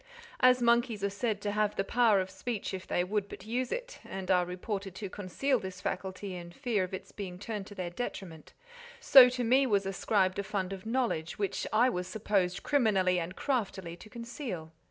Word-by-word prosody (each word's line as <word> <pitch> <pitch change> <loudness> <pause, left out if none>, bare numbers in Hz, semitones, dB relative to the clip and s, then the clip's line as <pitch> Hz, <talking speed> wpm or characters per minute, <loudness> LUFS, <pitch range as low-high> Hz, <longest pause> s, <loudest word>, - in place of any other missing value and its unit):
As 250 -1 +5
monkeys 235 -3 +2
are 200 - +1
said 210 0 -2
to 205 - -1
have 210 0 +1
the 195 - 0
power 225 -1 +4
of 185 0 -3
speech 200 +3 -4
if 185 -1 -6
they 175 - +1
would 200 +2 -1
but - - -9
use 245 +3 -2
it, - - -4
and 190 0 -4
are 180 -1 +4
reported 195 +1 -5
to 200 -1 -6
conceal 235 +7 0
this 190 -2 -7
faculty 190 +1 -4
in 175 -1 -8
fear 230 -2 0
of 185 - -5
its 190 - -7
being 185 -3 -6
turned 205 0 -5
to 205 - -11
their 180 -2 -4
detriment, 175 -6 -6 0.5
so 255 -2 +9
to 250 0 -2
me 260 +4 +4
was 200 -4 +2
ascribed 195 0 +1
a - - 0
fund 195 -2 -2
of 195 +2 -8
knowledge 225 -10 -1
which 200 -2 -2
I 230 +4 +5
was 180 -2 -3
supposed 195 -2 0
criminally 195 -10 +3
and 175 +2 -5
craftily 195 -10 -2
to 215 - -13
conceal. 230 - -6
200 Hz, 200 wpm, -31 LUFS, 185-235 Hz, 0.5 s, so